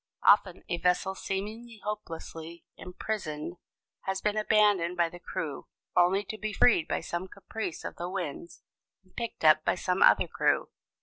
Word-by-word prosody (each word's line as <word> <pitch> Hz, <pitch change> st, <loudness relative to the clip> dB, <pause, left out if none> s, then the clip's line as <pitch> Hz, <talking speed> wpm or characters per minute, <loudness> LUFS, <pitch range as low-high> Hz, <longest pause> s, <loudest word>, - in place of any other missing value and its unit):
Often 190 Hz, -3 st, +4 dB
a 175 Hz, -, -1 dB
vessel 180 Hz, +1 st, +2 dB
seemingly 215 Hz, +5 st, -5 dB
hopelessly 170 Hz, -5 st, -6 dB
imprisoned 180 Hz, -4 st, -5 dB, 0.5 s
has 190 Hz, 0 st, -1 dB
been 210 Hz, +1 st, 0 dB
abandoned 205 Hz, -5 st, +3 dB
by 170 Hz, -1 st, +3 dB
the 175 Hz, -, -11 dB
crew, 165 Hz, -6 st, -5 dB, 0.3 s
only 180 Hz, +3 st, +4 dB
to 215 Hz, +2 st, -6 dB
be 215 Hz, -1 st, -3 dB
freed 195 Hz, -7 st, +4 dB
by -, -, -1 dB
some 175 Hz, +2 st, -4 dB
caprice 200 Hz, -1 st, -6 dB
of -, -, -6 dB
the 175 Hz, +1 st, -4 dB
winds 175 Hz, -3 st, -5 dB, 0.4 s
and 185 Hz, -, -28 dB
picked 235 Hz, -8 st, -4 dB
up 155 Hz, 0 st, +7 dB
by -, -, +2 dB
some 180 Hz, +1 st, -1 dB
other -, -, +6 dB
crew. -, -, +1 dB
185 Hz, 160 wpm, -29 LUFS, 170-210 Hz, 0.5 s, up